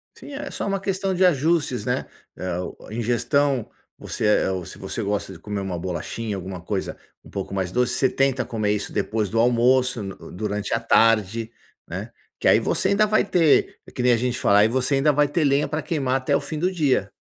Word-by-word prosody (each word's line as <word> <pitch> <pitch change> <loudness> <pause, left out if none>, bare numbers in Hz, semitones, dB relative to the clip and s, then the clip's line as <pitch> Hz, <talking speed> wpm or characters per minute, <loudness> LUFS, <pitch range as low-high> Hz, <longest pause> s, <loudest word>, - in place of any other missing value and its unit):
Sim, - - -12
é 285 +1 -6
só - - -4
uma 195 0 0
questão 195 0 -1
de 185 +1 +3
ajustes, 155 - +1
né, - - -1 0.3
eh, 90 -1 -3
o 90 - -5
a - - -9
ingestão 120 +3 +1 0.3
você - - -4
é 105 -2 +3
ou 95 -1 -3
se - - -10
você 95 +4 -5
gosta 100 -1 -2
de 85 - -12
comer 100 +3 -4
uma 90 -3 -4
bolachinha, 95 +5 -4
alguma 95 -1 -6
coisa 95 +1 -3 0.3
um - - -15
pouco 100 0 -5
mais 95 -2 -2
doce, 125 0 +1
você 130 - +2
tenta 135 -2 +1
comer 110 -3 -1
isso 105 - -3
depois 105 0 -1
do 115 - 0
almoço, 125 0 +3
no 95 -1 -9
durante 105 +2 -3
a - - +2
tarde, 115 0 +2 0.4
né? - - -6 0.3
Que - - 0
aí - - +6
você 190 - 0
ainda 210 +2 +3
vai 215 +1 +3
ter 175 -6 +2 0.2
que 125 - -2
nem 125 - +5
a - - +3
gente 125 +1 -1
falar 100 0 +4
aí 105 - +6
você 130 +4 0
ainda 140 +2 +3
vai 145 +1 +3
ter 150 +3 0
lenha 140 +1 +2
pra 150 +2 -2
queimar 140 -7 -1
até 130 - 0
o - - +1
fim 150 +2 -5
do 180 - +2
dia. 135 - +1
120 Hz, 225 wpm, -23 LUFS, 100-145 Hz, 0.4 s, aí